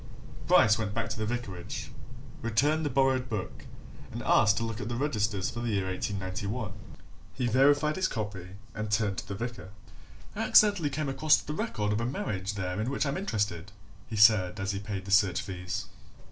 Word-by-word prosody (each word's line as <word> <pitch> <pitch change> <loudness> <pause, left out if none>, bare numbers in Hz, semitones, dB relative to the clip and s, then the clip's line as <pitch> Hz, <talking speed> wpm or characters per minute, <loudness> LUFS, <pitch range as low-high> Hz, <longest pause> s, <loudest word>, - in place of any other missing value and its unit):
Bryce 110 +1 +5
went 105 -2 -3
back 115 - -1
to - - -3
the 110 - -1
vicarage, 105 -7 -5 0.5
returned 145 +8 +1
the 145 - 0
borrowed 130 -1 +2
book, 105 -5 -5 0.5
and - - -6
asked 105 0 +4
to - - 0
look 115 -1 -4
at 110 - -4
the 120 - -2
registers 105 -8 -1
for 120 - -6
the 120 0 -2
year 100 -3 0
1891. 100 +3 -3 0.6
He 125 - -1
verified 145 +6 +3
his 190 0 +2
copy 100 -4 -5 0.3
and 110 0 -4
turned 105 -2 0
to - - -9
the 100 - -4
vicar. 115 -4 -6 0.7
"I - - -6
accidentally 200 -8 +5
came 150 0 -3
across 150 +3 +4
the 150 - -5
record 115 - -1
of 105 - -1
a - - -1
marriage 105 -6 -3
there 95 0 -2
in 115 - -1
which 140 - -1
I'm 140 - -1
interested," 105 - -2 0.4
he 115 - -6
said 105 -3 +5
as 95 +1 -1
he 100 - -3
paid 100 -2 -5
the 100 - -6
search 100 -3 +4
fees. 90 -1 -4
110 Hz, 190 wpm, -29 LUFS, 100-130 Hz, 0.7 s, Bryce